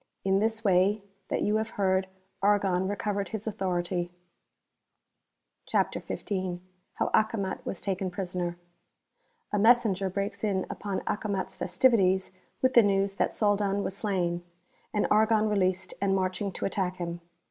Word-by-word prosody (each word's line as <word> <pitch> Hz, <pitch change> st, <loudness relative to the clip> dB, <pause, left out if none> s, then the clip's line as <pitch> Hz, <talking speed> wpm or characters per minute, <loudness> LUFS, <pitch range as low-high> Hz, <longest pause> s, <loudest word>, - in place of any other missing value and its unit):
In 195 Hz, 0 st, +3 dB
this 220 Hz, +1 st, 0 dB
way 195 Hz, +1 st, +3 dB, 0.2 s
that -, -, -1 dB
you 210 Hz, +1 st, +2 dB
have 220 Hz, 0 st, -2 dB
heard, 190 Hz, -1 st, +2 dB, 0.3 s
Argon 195 Hz, -2 st, +2 dB
recovered 200 Hz, -1 st, -2 dB
his 220 Hz, +1 st, -5 dB
authority. 180 Hz, -4 st, -1 dB, 1.6 s
CHAPTER -, -, +1 dB
XV. 185 Hz, -3 st, -3 dB, 0.4 s
How -, -, -1 dB
Acomat 215 Hz, -3 st, +1 dB
was 185 Hz, -, -3 dB
taken 190 Hz, -1 st, -1 dB
Prisoner. 180 Hz, -1 st, -3 dB
•f -, -, -20 dB, 1.0 s
(A 205 Hz, -, +2 dB
MESSENGER 215 Hz, -4 st, +4 dB
breaks 200 Hz, +3 st, -3 dB
in 195 Hz, -3 st, 0 dB
upon 200 Hz, -2 st, -3 dB
Acomat's 200 Hz, -3 st, -2 dB
festivities 190 Hz, -7 st, +3 dB, 0.3 s
with 260 Hz, 0 st, +4 dB
the 235 Hz, -, +8 dB
news 195 Hz, -1 st, +1 dB
that -, -, +1 dB
Soldan 205 Hz, -1 st, +1 dB
was 190 Hz, -, -2 dB
slain, 180 Hz, -5 st, -1 dB, 0.5 s
and 210 Hz, -, +1 dB
Argon 220 Hz, 0 st, +4 dB
released 190 Hz, -2 st, 0 dB
and 195 Hz, -1 st, +2 dB
marching 190 Hz, +2 st, -1 dB
to -, -, -3 dB
attack 185 Hz, -2 st, -1 dB
him. 175 Hz, -1 st, -5 dB
195 Hz, 140 wpm, -28 LUFS, 185-210 Hz, 1.6 s, the